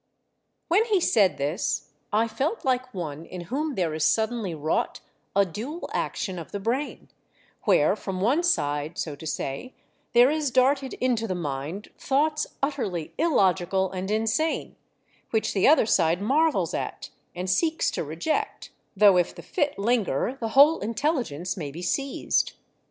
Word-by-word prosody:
When 390 +6 +3
he 425 -5 +2
said 210 - +3
this 150 +8 -2 0.2
I 220 +2 +2
felt 270 - -2
like 255 -1 0
one 160 - -5
in 180 +1 -8
whom 300 0 -1
there 170 -4 0
is 155 0 -1
suddenly 220 -4 +1
wrought 155 +1 -1 0.4
a 200 0 +5
dual 240 - -6
action 185 -3 -2
of 165 - -9
the 200 - -3
brain; 245 +8 -3 0.6
where 190 -4 +4
from 190 -3 -5
one 250 - +2
side, 150 - 0
so 150 -3 -3
to 160 +3 -9
say, 150 - -4 0.4
there 245 +3 +6
is 305 -2 0
darted 265 +2 +2
into 240 -3 0
the 185 - -2
mind 155 +4 -4
thoughts 300 +2 +1 0.2
utterly 200 - -2
illogical 190 - +2
and 185 +1 -4
insane, 225 +9 0 0.5
which 220 -1 0
the 195 - +3
other 305 -5 +6
side 170 -5 +2
marvels 300 +10 +2
at, - - -4 0.2
and 180 +1 -4
seeks 315 - +1
to - - -2
reject, 170 - -3 0.3
though 200 -2 +7
if 175 -1 +1
the - - -10
fit 295 -5 -1
linger 220 - 0
the 225 - -2
whole 300 +4 +7
intelligence 225 - -1
may 155 -6 -5
be 165 +5 -8
seized. 275 - 0
215 Hz, 155 wpm, -26 LUFS, 175-275 Hz, 0.6 s, though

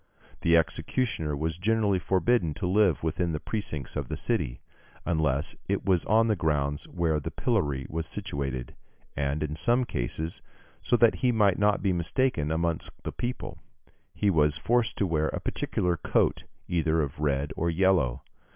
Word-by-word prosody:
The 85 0 +4
executioner 80 - -1
was 80 +2 -2
generally 105 -1 +2
forbidden 95 -1 +1
to 100 - -3
live 95 -4 +3
within 85 +1 0
the 75 - -2
precincts 75 - -4
of - - -3
the - - -4
city, - - -1 0.5
unless 75 -4 0
it - - 0
was 90 -3 +2
on 110 +2 +4
the 110 -2 +2
grounds 75 -4 -1
where 85 -3 0
the 70 - -4
pillory 65 -3 0
was 80 +1 -3
situated; 70 -10 -4 0.4
and, 70 +2 -1
in 75 0 -3
some 120 +9 +2
cases, 80 - -4 0.4
so 120 - +2
that 115 -1 +4
he 125 -1 +2
might 105 -5 +3
not 105 -1 +2
be 95 -2 +2
mistaken 85 - 0
amongst 85 0 -1
the - - -3
people, 120 +1 -5 0.6
he 100 -1 +2
was 75 -3 +3
forced 115 +8 +1
to 100 - +2
wear 80 -3 +1
a - - -3
particular 90 -1 -1
coat, - - +1 0.2
either 80 -2 +1
of 70 +1 -5
red 70 -1 0
or 85 - 0
yellow. 80 -8 +2
85 Hz, 165 wpm, -28 LUFS, 75-100 Hz, 0.6 s, The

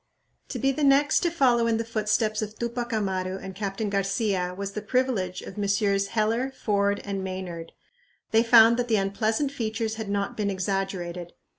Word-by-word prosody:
To - - -4
be 270 +1 +2
the 295 +2 -2
next 285 +2 +4
to 345 - +1
follow 250 -8 +3
in 225 -1 +2
the 230 - -1
footsteps 215 -1 0
of 215 0 -5
Tupac 235 0 -3
Amaru 190 -3 -1
and 190 0 -8
Captain 200 +2 -3
Garcia 195 -2 -1
was 200 0 -4
the 210 - -5
privilege 210 -6 -1
of - - -8
Messrs. 200 -1 +1
Heller, 225 +5 0
Ford, 200 -5 0
and 195 -1 -3
Maynard. 180 -3 -6 0.6
They 225 - +5
found 230 0 +7
that 245 0 -1
the 225 - +2
unpleasant 215 +7 0
features 225 -3 -3
had 220 -2 -5
not 200 0 -1
been 205 -2 -1
exaggerated. 185 -2 -3
210 Hz, 175 wpm, -26 LUFS, 195-230 Hz, 0.6 s, found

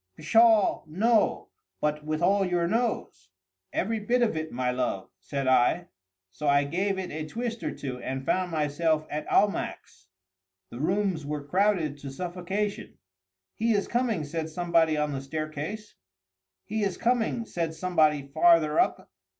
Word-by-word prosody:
"Pshaw, 225 +5 +4
no!—but 165 -5 0
with 155 +2 -2
all 200 +2 +4
your 175 -2 +1
nose?" 225 - -2 0.4
"Every 220 +4 -1
bit 240 +4 +1
of 220 - +1
it, 155 0 -3
my 125 0 -1
love," 125 -6 -2
said 140 -2 -4
I:—so 95 - -1
I 140 0 +4
gave 190 +7 -1
it 190 -1 -4
a 155 0 -4
twist 235 +4 -4
or - - -2
two, 130 -3 -6
and 130 +1 -4
found 185 +3 +1
myself 155 0 0
at 150 +1 -4
Almack's. 200 - 0 0.6
The 120 - -8
rooms 185 0 0
were 145 0 -4
crowded 175 -3 +1
to 140 - -7
suffocation. 185 +6 -4 0.6
"He 225 +1 +1
is 200 -1 0
coming!" 235 -8 0
said 160 +2 -4
somebody 165 -1 +2
on 150 0 0
the 135 -1 -3
staircase. 155 +8 -5 0.7
"He 215 +1 -2
is 195 -3 -1
coming!" 235 -1 0
said 165 -5 -3
somebody 155 -5 +2
farther 155 +2 +4
up. - - +1
165 Hz, 145 wpm, -27 LUFS, 145-200 Hz, 0.7 s, Pshaw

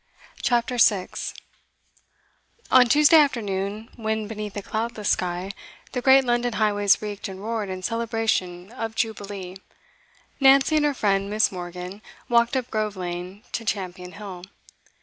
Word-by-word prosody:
CHAPTER 240 0 +1
6 205 -4 +2 1.4
On 250 -1 +7
Tuesday 300 +5 +6
afternoon, 215 -7 0
when, 220 -1 -2
beneath 210 -1 -6
a 205 - -4
cloudless 220 -1 -3
sky, 180 +1 -1 0.4
the 250 - -2
great 265 +1 +6
London 240 0 +1
highways 205 -2 +2
reeked 205 0 -5
and 190 -1 -8
roared 215 -1 -3
in 185 0 -5
celebration 225 -5 -1
of 225 -2 -5
Jubilee, 200 -5 -4 0.8
Nancy 275 +3 +5
and 300 - +3
her 290 -1 +1
friend 195 -3 +1
Miss. 215 +1 +2
Morgan 180 +2 -7 0.3
walked 235 +2 +3
up 255 -1 -4
Grove 215 -1 -1
Lane 180 +3 -6
to 230 - -3
Champion 180 -4 -4
Hill. 195 -4 -8
215 Hz, 135 wpm, -24 LUFS, 195-235 Hz, 1.4 s, On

